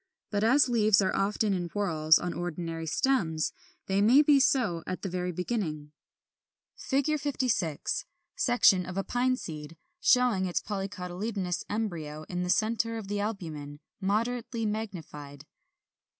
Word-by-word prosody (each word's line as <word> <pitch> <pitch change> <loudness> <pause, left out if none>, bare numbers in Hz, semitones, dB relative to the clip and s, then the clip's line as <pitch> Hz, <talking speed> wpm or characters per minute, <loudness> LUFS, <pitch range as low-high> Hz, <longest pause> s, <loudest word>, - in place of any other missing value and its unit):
But 205 0 0
as 260 +5 +5
leaves 215 -4 +4
are 185 - 0
often 205 +1 +1
in 175 -2 -2
whorls 160 -6 +3
on 175 - -3
ordinary 165 -1 -4
stems, 160 - +1 0.3
they 195 +1 +1
may 250 +8 +6
be 290 -1 +5
so 230 -11 +2
at 185 - -4
the 195 - -2
very 180 0 -2
beginning. 165 -6 -3 0.8
[Illustration: 285 +3 0
Fig. - - -11
56. 250 - -1 0.3
Section 200 -7 +4
of 185 +1 -6
a 195 - 0
Pine 255 +3 +1
seed, 155 - -8 0.2
showing 250 - +3
its 175 - 0
polycotyledonous 190 -1 -3
embryo 165 -8 -3
in 180 -1 -2
the 180 - -2
centre 225 +3 +1
of 205 -3 -7
the 205 0 -1
albumen, 160 -9 -5 0.2
moderately 230 +3 -1
magnified. 160 -10 -6
195 Hz, 140 wpm, -29 LUFS, 170-230 Hz, 0.8 s, may